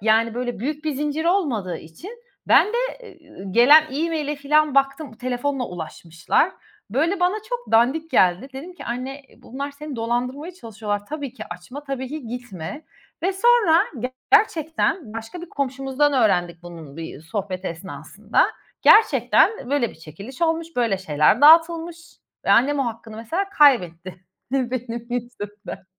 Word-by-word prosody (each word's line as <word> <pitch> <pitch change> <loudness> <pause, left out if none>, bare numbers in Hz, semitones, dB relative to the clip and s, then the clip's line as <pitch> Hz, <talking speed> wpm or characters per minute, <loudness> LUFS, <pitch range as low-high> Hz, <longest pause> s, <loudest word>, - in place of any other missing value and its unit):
yani 225 +2 +2
böyle 245 -2 -3
büyük 300 +6 -4
bir 310 - 0
zincir 295 +3 -2
olmadığı 255 - 0
için 165 - -11 0.4
ben - - +6
de 425 - -6 0.7
ı 195 -1 -7
gelen 280 +8 +8
e-mail'e 300 0 -2
filan 300 +1 +2
baktım, 275 0 +1
telefonla 255 +3 -2
ulaşmışlar. 165 0 -1 0.4
Böyle 330 - 0
bana 360 +2 +2
çok - - -5
dandik 275 +8 +3
geldi. 185 +1 +3
Dedim 305 +8 -9
ki - - -10
"Anne, 260 +4 -5
bunlar 280 +3 -6
seni 285 -1 -8
dolandırmaya 250 +8 -2
çalışıyorlar. 215 - -5
Tabii 285 -3 -5
ki - - -8
açma, 215 +12 -9
tabii 265 -2 -4
ki 295 -4 -7
gitme." 245 - -7 0.4
ve 380 +2 +1
sonra 415 -5 +4 0.5
gerçekten 325 - +2
başka 225 +10 -7
bir 350 - -9
komşumuzdan 270 +1 0
öğrendik 180 -9 +1
bunun 165 -4 -11
bir 160 -3 -7
sohbet 185 +3 -5
esnasında. 175 - -2 0.4
Gerçekten 435 - +4
böyle 280 -5 +1
bir - - -16
çekiliş 180 - -10
olmuş, 325 0 +1
böyle 230 -6 +1
şeyler 155 - +2
dağıtılmış 330 +2 +5 0.5
ve - - +1
annem 280 +4 +4
o 275 - +1
hakkını, 225 -1 -7
mesela, 235 - -2
kaybetti 185 - +3 0.4
benim 245 -3 -2
yüzümden. 220 -5 -6
255 Hz, 140 wpm, -22 LUFS, 210-305 Hz, 0.7 s, gelen